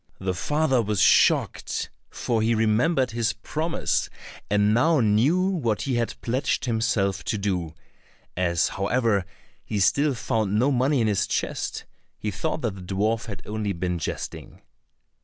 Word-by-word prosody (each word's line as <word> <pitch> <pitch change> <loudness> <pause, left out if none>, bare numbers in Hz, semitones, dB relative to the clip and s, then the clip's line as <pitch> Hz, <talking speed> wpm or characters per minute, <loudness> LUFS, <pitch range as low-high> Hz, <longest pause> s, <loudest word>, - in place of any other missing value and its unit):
The 95 -1 -1
father 135 - +1
was 105 -2 -1
shocked, - - +3 0.2
for 115 -2 -1
he 115 +1 +2
remembered 120 +5 +2
his 115 +1 0
promise, 155 +9 -2 0.4
and 105 +1 +3
now 155 +7 +3
knew 120 - +3
what 120 - 0
he 135 - -1
had 115 -1 -2
pledged 125 +2 0
himself 110 -5 0
to 110 - -1
do; 90 -5 -2 0.6
as 85 -2 +1
however, 100 0 0 0.4
he 105 - -3
still 140 +8 +3
found 110 -3 0
no 130 +6 +3
money 130 +1 +2
in 110 - +2
his 105 -2 +1
chest, - - -3 0.3
he 105 - -3
thought 155 - -3
the 115 - 0
dwarf 100 +5 -2
had 100 - -7
only 105 -1 -2
been 90 0 -2
jesting. - - -6
110 Hz, 145 wpm, -25 LUFS, 100-125 Hz, 0.6 s, shocked